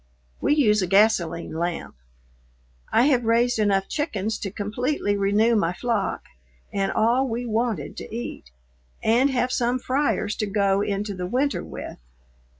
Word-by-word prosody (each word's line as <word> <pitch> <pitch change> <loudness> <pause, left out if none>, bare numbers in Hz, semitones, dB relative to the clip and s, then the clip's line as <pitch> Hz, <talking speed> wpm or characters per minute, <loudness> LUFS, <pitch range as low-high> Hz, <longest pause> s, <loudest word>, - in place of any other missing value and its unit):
We 295 - +3
use 215 -8 +3
a 185 - 0
gasoline 190 -5 +2
lamp. 170 - -3 1.0
I 235 - +4
have 260 -3 +3
raised 230 +1 +2
enough 195 -2 +2
chickens 220 - -2
to 200 - -4
completely 210 +3 -1
renew 205 +4 +3
my 175 -5 +1
flock, 230 0 -2 0.5
and 195 -1 0
all 245 +4 +2
we 240 +1 -3
wanted 220 - -1
to - - -8
eat, 225 - -6 0.5
and 240 +5 +4
have 250 -1 0
some 245 0 +1
fryers 255 -5 0
to 215 - -1
go 200 -1 +2
into 205 0 -2
the 180 -1 -4
winter 270 +7 0
with. - - -8
220 Hz, 150 wpm, -24 LUFS, 195-245 Hz, 1.0 s, I